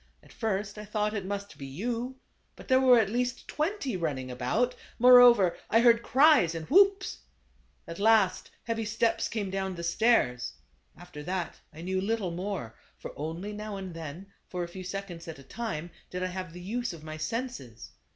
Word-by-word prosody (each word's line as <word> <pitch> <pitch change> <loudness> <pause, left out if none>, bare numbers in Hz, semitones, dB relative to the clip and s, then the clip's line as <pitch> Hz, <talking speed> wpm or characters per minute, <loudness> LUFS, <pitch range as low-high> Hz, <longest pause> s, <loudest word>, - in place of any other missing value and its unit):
At - - -18
first 210 -2 -2
I 210 - -7
thought 210 0 -1
it 200 -3 -3
must 200 0 -5
be 140 - -6
you, 235 - -3 0.4
but - - -13
there 260 -1 +5
were 255 -2 +7
at 210 -3 +2
least 250 +2 -2
twenty 305 - -2
running 140 -7 -3
about; 125 - 0 0.2
moreover, 245 -6 +7
I 230 - +5
heard 235 -1 +6
cries 265 - +5
and 160 -1 -5
whoops. 390 +2 +4 0.7
At 170 +2 -7
last, 210 -3 +3
heavy 225 0 -2
steps 225 +1 0
came 205 -4 -3
down 190 -1 -2
the 170 - -6
stairs. 170 - +2 0.4
After 175 -4 -10
that 180 -1 -3
I 160 - -11
knew 185 +2 -1
little 205 -3 -1
more; 180 - -4 0.2
for - - -8
only 165 +7 -5
now 210 -1 -5
and 190 -2 -6
then, 165 +2 -7 0.2
for 180 -1 -3
a - - -4
few 185 +2 -8
seconds 185 -3 -6
at 160 - -7
a 135 - -13
time, 175 - -5 0.2
did 180 0 -4
I - - 0
have 185 -2 -5
the 180 +1 -10
use 230 +3 -3
of 160 -2 -11
my 155 0 -7
senses. 155 - -5
195 Hz, 185 wpm, -29 LUFS, 170-230 Hz, 0.7 s, were